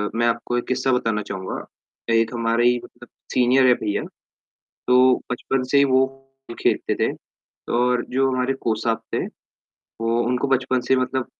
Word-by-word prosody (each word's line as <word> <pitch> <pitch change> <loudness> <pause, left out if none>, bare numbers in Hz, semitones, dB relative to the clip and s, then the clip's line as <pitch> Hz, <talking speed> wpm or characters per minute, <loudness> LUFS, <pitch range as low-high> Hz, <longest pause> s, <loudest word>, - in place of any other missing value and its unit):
मैं 120 +1 +2
आपको 120 +1 -1
एक 120 - -3
किस्सा 130 +1 0
बताना 115 -4 0
चाहूँगा, 95 -2 -5 0.5
एक 115 0 +2
हमारे 115 0 +2
ही 125 0 +3
मतलब 120 0 -14 0.3
सीनियर 130 +1 +4
है 125 - +7
भईया, 105 -3 -2 0.9
तो 125 0 +6 0.2
बचपन 130 +1 -1
से 140 - +5
ही 140 - +6
वो 130 -1 +3 0.6
खेलते - - +1
थे - - 0 0.7
और 125 0 +2
जो 135 +1 +2
हमारे 130 +1 0
कोच 110 -1 -1
साब 115 0 0
थे, - - 0 0.6
वो 115 +1 -2
उनको 125 +3 0
बचपन 130 -1 +1
से 130 - +4
मतलब 130 0 -1
125 Hz, 165 wpm, -22 LUFS, 115-130 Hz, 0.9 s, है